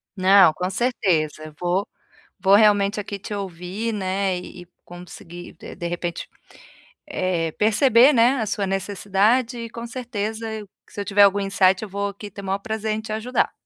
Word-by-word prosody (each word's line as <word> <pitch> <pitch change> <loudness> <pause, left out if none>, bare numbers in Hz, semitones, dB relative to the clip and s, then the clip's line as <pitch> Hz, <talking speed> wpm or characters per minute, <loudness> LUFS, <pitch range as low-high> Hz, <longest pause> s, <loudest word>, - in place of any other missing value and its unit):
Não, 190 -3 +6
com 180 +3 -3
certeza, 165 -9 -1
vou 180 +3 0 0.5
vou 195 0 +5
realmente 205 -1 +4
aqui 200 0 -7
te 205 - -7
ouvir, 195 +3 -4
né, 190 -1 -1
e 180 0 -9
e - - -23 0.2
conseguir 175 0 -11
de - - -11
de 175 -1 -4
repente, 175 0 -4 0.8
eh, 185 - -1
perceber, 235 +5 +4
né, 245 +2 +4
a - - -1
sua 205 -1 -1
necessidade 205 +5 0
e 230 0 -6
com 235 0 -7
certeza 225 -2 -4
eu 215 -2 -7 0.2
se - - -9
eu - - -5
tiver 200 +1 +4
algum 200 0 +4
insight 195 0 +2
eu 215 - -7
vou 200 +1 -2
aqui 200 +1 -10
ter 200 - -9
o - - -10
maior 195 +1 -1
prazer 220 +1 -3
em 215 - -3
te 220 - -8
ajudar. 225 +4 0
200 Hz, 180 wpm, -22 LUFS, 185-220 Hz, 0.8 s, Não